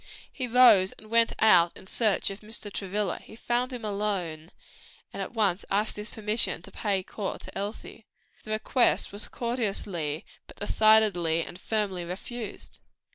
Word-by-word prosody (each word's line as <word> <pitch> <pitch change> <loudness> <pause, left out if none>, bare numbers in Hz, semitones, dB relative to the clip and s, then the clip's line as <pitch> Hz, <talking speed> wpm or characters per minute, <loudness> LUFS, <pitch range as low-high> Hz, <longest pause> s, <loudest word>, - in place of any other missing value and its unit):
He 255 -3 -3
rose 230 -6 +6
and 215 +1 -16
went 230 0 +5
out 175 -6 +5
in - - -13
search 210 0 +1
of 195 - -8
Mr. 215 -1 -5
Travilla, 200 +1 -2 0.2
found 245 +2 -1
him 240 -3 -6
alone, 195 -6 -3 0.6
and - - -5
at - - -5
once 200 -4 +1
asked 210 +2 +1
his 210 +1 -6
permission 215 -4 -1
to - - -11
pay 200 -3 -1
his - - -21
addresses 205 -3 -4
to - - -11
Elsie. 205 +2 -6 0.4
The - - -12
request 220 +3 +2
was 205 +1 -5
courteously, 200 - -3 0.2
but - - -14
decidedly 205 -7 +4
and 175 - -10
firmly 205 -5 -1
refused. 205 +6 -7
210 Hz, 155 wpm, -28 LUFS, 190-220 Hz, 0.6 s, rose